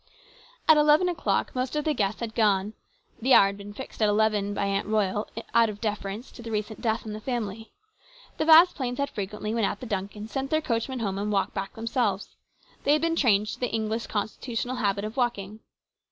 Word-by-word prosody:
At 315 - +8
eleven 300 +4 +5
o'clock 350 -2 -1
most 255 +2 -2
of 300 - -1
the 310 - +2
guests 210 -4 -1
had 230 -2 -4
gone. 210 -2 +2 0.5
The 260 +3 +5
hour - - +8
had 200 0 -2
been 200 +1 -8
fixed 245 +2 -9
at 215 - +4
eleven 210 -1 +2
by 200 - 0
Aunt 200 0 -1
Royal 210 -1 0 0.2
out 230 -1 +5
of 205 -1 -7
deference 210 +1 -4
to - - -12
the 230 - -7
recent 215 0 -3
death 225 -2 -1
in 215 - -5
the 215 - -7
family. 225 -3 -4 0.7
The - - +1
Vasplaines 315 -6 +6
had 280 0 -1
frequently, 210 +1 -4
when 230 -1 0
at 205 - 0
the - - -7
Duncans', 205 0 -4
sent 270 0 -2
their 310 - +2
coachman 245 -2 -2
home 195 -3 -2
and 210 +1 -2
walked 195 -1 0
back 195 -1 -5
themselves. 225 -3 -1 0.5
They 285 - +4
had 305 - +2
been 330 0 +1
trained 215 -9 +3
to - - -6
the 250 - -1
English 220 +1 -2
constitutional 230 +4 -3
habit 200 -3 0
of 215 +4 -7
walking. 215 -4 -1
220 Hz, 210 wpm, -26 LUFS, 205-250 Hz, 0.7 s, At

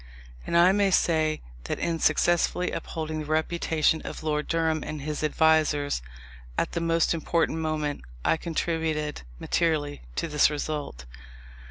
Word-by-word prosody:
And 170 - +2
I 175 +2 +7
may 200 0 +3
say 155 -4 +2 0.2
that - - -2
in 165 -1 -1
successfully 175 +3 +2
upholding 155 -1 -4
the 155 - -4
reputation 160 0 +1
of - - -7
Lord 150 -1 -1
Durham 160 -2 0
and 150 -2 -5
his 150 0 -3
advisers 155 - +2 0.6
at - - 0
the 170 - -2
most 165 0 +2
important 165 0 0
moment, 155 -2 -2 0.2
I - - +4
contributed 160 -2 -2 0.2
materially 155 -4 0
to - - -1
this 150 -2 +4
result. 145 - -4
155 Hz, 140 wpm, -27 LUFS, 150-165 Hz, 0.6 s, I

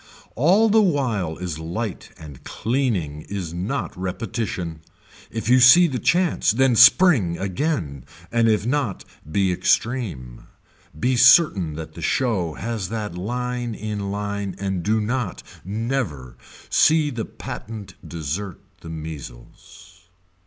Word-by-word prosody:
All 185 - +4
the 220 +1 +4
while 120 - 0
is 90 -4 -5
light 90 +5 -5
and 75 -4 -12
cleaning 110 - -2
is 95 -5 -4
not 100 +11 -3
repetition. 95 -3 -4 0.5
If 110 -2 -5
you 125 +1 +5
see 130 +8 +8
the 135 -7 -2
chance 180 -1 +2
then 130 +2 +3
spring 125 - +6
again 95 - -3 0.3
and 115 -1 +3
if 105 -1 +1
not 125 -6 -1 0.3
be 95 +1 +2
extreme, 90 - -1 0.5
be 130 +6 +1
certain 120 - +5
that 80 0 -8
the - - -10
show 95 -11 0
has 110 -3 -4
that 105 -5 -4
line 120 +4 -3
in 105 -2 -4
line 100 -1 -3
and 95 -2 -2
do 110 +5 +1
not, 110 -2 -3 0.2
never, 100 - -3 0.4
see 155 -2 +4
the 115 -3 -3
patent 105 -5 -8 0.2
desert 85 +4 -4 0.2
the 80 - -10
measles. 80 0 -10
105 Hz, 125 wpm, -22 LUFS, 85-125 Hz, 0.5 s, see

